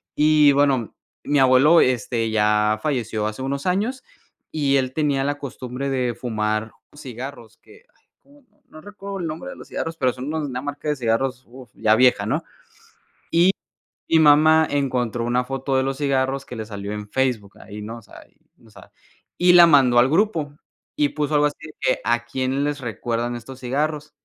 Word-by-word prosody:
Y 150 -1 +5
bueno, 135 -5 +1 0.3
mi 145 -1 +1
abuelo, 135 +5 +6
este, 115 -2 0
ya 105 0 +2
falleció 115 -7 -2
hace 110 +4 -6
unos 140 +1 -3
años, 210 +9 -1 0.5
y 140 -3 +1
él 130 -1 -1
tenía 145 -3 0
la 145 0 -1
costumbre 135 -1 -6
de 125 -3 -1
fumar 110 -2 -2 0.2
cigarros 125 -4 -9
que, - - -20
ay, - - -37 0.2
cómo, 285 +1 -22
no - - -37
no 155 - -13
recuerdo 200 -1 -8
el 170 - -3
nombre 155 +1 -6
de - - -8
los - - -13
cigarros, 165 0 -4
pero, 130 -5 +1
son 130 0 -7
unos, 155 0 -3
una 125 0 -4
marca 145 +1 -5
de 150 - +1
cigarros, 125 +2 -1
uf, 125 0 -14
ya 110 0 +3
vieja, 125 +2 +3
¿no?, - - -1 0.9
y 175 +3 +4 0.6
mi 165 - +4
mamá 155 +1 +5
encontró 125 -5 -1
una 125 +1 0
foto 135 +1 -2
de 130 - +2
los 135 +1 -3
cigarros 135 -1 0
que - - -8
le 110 - -5
salió 100 -1 -6
en 105 0 -6
Facebook 125 -7 -2
ahí, 105 +1 -10
¿no?, 115 +3 -7
o - - -15
sea, 105 - -15
y - - -36 0.3
no - - -20
sabe. - - -16 0.5
Y 180 0 +5
la 175 -1 +9
mandó 130 -6 +5
al 125 - +5
grupo 160 -6 0 0.4
y 145 -1 +1
puso 150 0 -2
algo 150 0 +4
así 145 - -3 0.2
que, 130 - +1
¿a 120 0 0
quién 130 +3 -2
les 145 -1 -2
recuerdan 120 0 -3
estos 130 +2 -11
cigarros? 150 +4 -2
135 Hz, 190 wpm, -22 LUFS, 120-150 Hz, 0.9 s, la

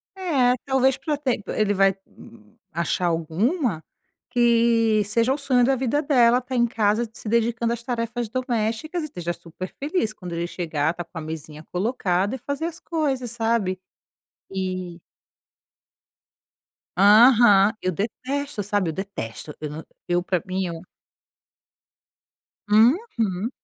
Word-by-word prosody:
É, 280 -10 +2
talvez 265 -1 +2
pra 290 +2 -2
ter 260 -6 -1
ele 210 -1 +1
vai 195 -1 +3 0.8
achar 170 +2 -1
alguma 175 - 0 0.5
que 230 -3 +3
seja 230 +5 +1
o - - -3
sonho 260 -4 +2
da 270 +1 +3
vida 265 +3 0
dela, 245 -4 +4
estar 255 +1 -4
em 240 -1 +3
casa, 220 0 +1
se 225 - -11
dedicando 235 +1 +1
às 235 - -5
tarefas 235 -1 -3
domésticas 245 +6 -2
e - - -3
esteja 175 - -4
super 170 +2 -9
feliz; 285 - -1
quando 180 -5 -8
ele 170 +1 -2
chegar 160 -4 -1
estar 175 0 -6
com 170 0 -13
a - - -4
mesinha 155 -1 -7
colocada 195 0 0
e - - -5
fazer 285 +5 -4
as 335 0 -5
coisas, 275 -9 -2
sabe. 225 -5 0 0.7
E 185 -2 -4 2.0
Aham. 210 0 +7
Eu 185 - 0
detesto, 255 - -3
sabe, 200 -3 0
eu - - -3
detesto. 155 - -6
Eu 150 - -4
na 155 +2 -7 0.2
eu 175 0 +1
pra 180 -2 0
mim, 185 0 -2
é. - - -8 1.9
Uhum. 225 - +2
225 Hz, 135 wpm, -23 LUFS, 185-255 Hz, 2.0 s, Aham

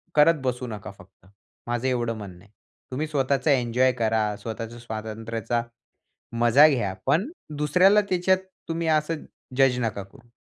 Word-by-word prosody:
करत 150 0 +5
बसू 125 0 -2
नका, 105 -4 -7
फक्त - - -19 0.4
माझं 120 +2 -1
एवढं 120 -3 -1
म्हणणं 95 -3 -10
आहे. 105 - -25 0.4
तुम्ही 150 +5 -2
स्वतःचा 140 0 +1
एन्जॉय 125 0 +3
करा. 110 -3 0
स्वतःच्या 115 +1 -6
स्वातंत्र्याचा 115 0 -4 0.8
मजा 125 +6 +7
घ्या. 115 -10 0
पण 205 - +2 0.3
दुसऱ्याला 180 +8 +4
त्याच्यात 185 +1 +3 0.3
तुम्ही 165 0 -2
असं 155 0 0 0.3
जज् 135 -2 +4
नका 110 -4 -2
करू. 120 +5 -19
125 Hz, 140 wpm, -25 LUFS, 115-150 Hz, 0.8 s, मजा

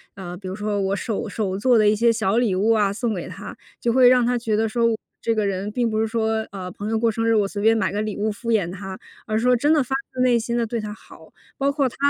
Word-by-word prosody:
呃， 180 -2 -7
比 190 0 -9
如 185 - -4
说 210 0 -2
我 195 0 0
手 220 +2 -3
手 200 -2 -2
做 245 +4 +3
的 215 -1 +5
一 - - +3
些 230 +2 +3
小 220 -1 0
礼 235 -6 +2
物 205 +4 +2
啊 205 -3 +2
送 230 +1 -1
给 180 -4 -5
她， - - -9 0.2
就 235 - +1
会 250 +1 +6
让 250 -1 +5
她 245 +1 +1
觉 225 -2 -1
得 220 +1 +1
说， 235 +2 +1 0.4
这 230 - 0
个 215 -1 +1
人 195 +1 -2
并 235 +2 0
不 215 0 -1
是 220 - +1
说， 220 -1 -1
呃， 185 -2 -6
朋 205 +4 -6
友 225 - +1
过 230 0 +2
生 225 +1 -1
日， 225 - +3
我 210 -2 +3
随 205 +1 -4
便 225 +2 +4
买 220 - 0
个 205 +1 -2
礼 215 -1 -3
物 215 +1 -1
敷 230 +3 -7
衍 200 -7 +1
她， 190 0 -7 0.3
而 215 - -1
是 225 - -1
说 250 0 +4
真 290 +6 +3
的 300 -3 +3
发 255 - -5 0.2
自 255 - -2
内 245 -2 +4
心 235 +1 -3
地 235 -1 +1
对 230 +1 -3
她 210 -1 -5
好。 - - -16 0.2
包 275 0 +1
括 280 -2 +1
她 - - -15
220 Hz, 315 characters per minute, -22 LUFS, 205-235 Hz, 0.4 s, 会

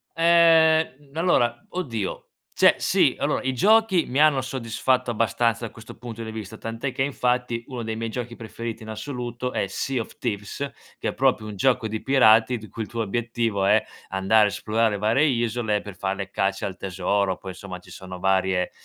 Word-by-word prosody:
Ehm, 160 -4 +4
allora, 135 -8 +1
oddio, 115 - -4 0.3
cioè - - +5
sì, - - +3
allora - - 0
i 130 0 0
giochi 205 - +4
mi 130 - -1
hanno 150 -3 +5
soddisfatto 130 0 -1
abbastanza 115 0 +1
da 115 - -7
questo 110 -1 -12
punto 115 -2 -8
di 110 - -6
vista, 110 -1 -7
tant'è 115 +5 -4
che 130 - -4
infatti 125 -3 0
uno 125 -3 -5
dei 110 0 -3
miei 115 0 -3
giochi 120 +1 -5
preferiti 115 0 -7
in 110 - -10
assoluto 125 +1 -5
è - - 0
Sea 130 +4 -2
of - - -10
Thieves, 115 +5 -3 0.3
che - - -3
è - - -4
proprio 130 -5 +1
un 105 -1 -6
gioco 120 +2 +2
di 110 0 -4
pirati 120 -3 +5
di 110 -1 -11
cui 110 +3 -5
il - - -10
tuo 115 -1 -2
obiettivo 115 -1 -1
è 105 +2 +5 0.3
andare 95 +3 +3
a - - +3
esplorare 110 +1 0
varie 110 +7 +2
isole 115 -5 0
per 100 -3 -9
fare 95 +1 -2
le 100 -1 -5
cacce 95 0 -1
al 95 - -4
tesoro. 95 +1 -1
Poi 95 - -8
insomma 95 0 -8
ci 90 - -18
sono 95 -1 -9
varie, 95 -1 +1
115 Hz, 190 wpm, -24 LUFS, 105-130 Hz, 0.3 s, cioè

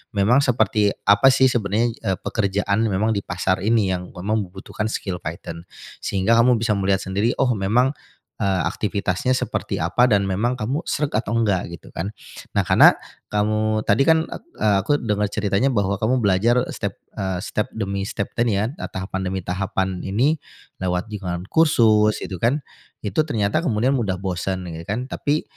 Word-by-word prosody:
memang 110 +7 +4
seperti 110 -5 +2 0.2
apa, 100 +6 +6
sih, 130 0 +4
sebenarnya, 115 +1 +1
eee, 95 -4 -1
pekerjaan 100 0 0
memang 105 +3 +1
di 100 - -1
pasar 95 0 -1
ini, 105 -2 +2
yang 90 0 -5
memang 105 +5 -2
membutuhkan 100 +3 -5
skill 95 -5 -4
Python. 85 +2 -7 0.3
Sehingga 100 +3 +1
kamu 120 +1 +5
bisa 110 -1 +1
melihat 95 -1 +1
sendiri, 100 +5 0
oh, 130 -2 +2
memang, 115 +6 +2 0.5
eee, 95 -2 +1
aktivitasnya 100 +3 -1
seperti - - -2
apa 105 +10 +3
dan 105 -4 +3
memang 105 +6 0
kamu 125 +6 -2
sreg 150 -1 -1
atau 110 +1 -1
nggak, 105 -6 +1
gitu, - - -16
kan. 100 +6 -5 0.4
Nah, - - +3
karena - - +6 0.3
kamu 110 +1 0
tadi, 110 +7 +3
kan, 160 0 +5
ek - - -6 0.2
e - - -3
aku 100 - -2
dengar 105 -2 0
ceritanya 100 +3 0
bahwa 100 -6 0
kamu 120 +2 +1
belajar 110 +6 +3
step, - - -4 0.2
eee, 95 -2 -2
step 105 +2 -2
demi 100 -2 -2
step 100 - -4
ini, 120 -3 +2
kan, 110 - 0
eee, - - -4
tahapan 95 0 -4
demi 95 0 -2
tahapan 95 +1 -1 0.2
ini, 130 +11 +1 0.4
lewat 90 +3 -2
jaringan 90 -4 -4
kursus 110 -9 +4
itu, 95 -3 -6
kan. 125 - +1 0.4
Itu 105 +8 +1
ternyata 105 -1 +1
kemudian 125 -4 +1
mudah 100 -6 -1
bosan 95 0 -3
gitu, 80 0 -7
kan, 115 +5 -2
tapi 150 +2 0
105 Hz, 170 wpm, -22 LUFS, 95-115 Hz, 0.5 s, apa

